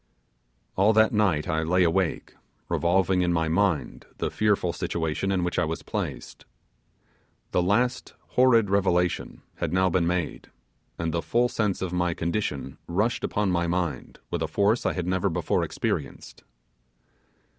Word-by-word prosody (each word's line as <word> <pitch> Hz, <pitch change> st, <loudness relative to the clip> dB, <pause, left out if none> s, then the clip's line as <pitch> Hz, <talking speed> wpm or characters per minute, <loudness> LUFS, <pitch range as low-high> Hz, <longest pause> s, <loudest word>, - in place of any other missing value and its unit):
All 100 Hz, +4 st, +4 dB
that 110 Hz, 0 st, +4 dB
night 100 Hz, -8 st, +2 dB
I 80 Hz, 0 st, 0 dB
lay 90 Hz, +3 st, +2 dB
awake, 85 Hz, 0 st, 0 dB, 0.4 s
revolving 90 Hz, +1 st, +2 dB
in 90 Hz, -1 st, +1 dB
my 80 Hz, -1 st, +1 dB
mind 85 Hz, 0 st, 0 dB
the -, -, -2 dB
fearful 100 Hz, -5 st, +1 dB
situation 80 Hz, +3 st, -2 dB
in 95 Hz, -2 st, +1 dB
which 90 Hz, -1 st, -1 dB
I -, -, +2 dB
was 80 Hz, +1 st, -4 dB
placed. -, -, -5 dB, 1.1 s
The -, -, +2 dB
last 120 Hz, +8 st, 0 dB
horrid 115 Hz, -5 st, +4 dB
revelation 90 Hz, -3 st, 0 dB
had -, -, -2 dB
now 95 Hz, 0 st, +2 dB
been 85 Hz, -1 st, +2 dB
made, 90 Hz, -2 st, -2 dB, 0.5 s
and 85 Hz, -1 st, -2 dB
the 85 Hz, -, 0 dB
full 120 Hz, +6 st, +1 dB
sense 105 Hz, -5 st, -1 dB
of 90 Hz, -1 st, -3 dB
my 90 Hz, -1 st, 0 dB
condition 85 Hz, -6 st, -3 dB
rushed 105 Hz, +7 st, 0 dB
upon 105 Hz, -2 st, 0 dB
my 85 Hz, -1 st, +1 dB
mind 85 Hz, -2 st, -2 dB
with -, -, -2 dB
a -, -, 0 dB
force 105 Hz, +4 st, +1 dB
I -, -, 0 dB
had 90 Hz, -, -3 dB
never 95 Hz, +2 st, 0 dB
before 80 Hz, -, 0 dB
experienced. 70 Hz, -2 st, -4 dB
90 Hz, 155 wpm, -26 LUFS, 85-100 Hz, 1.1 s, All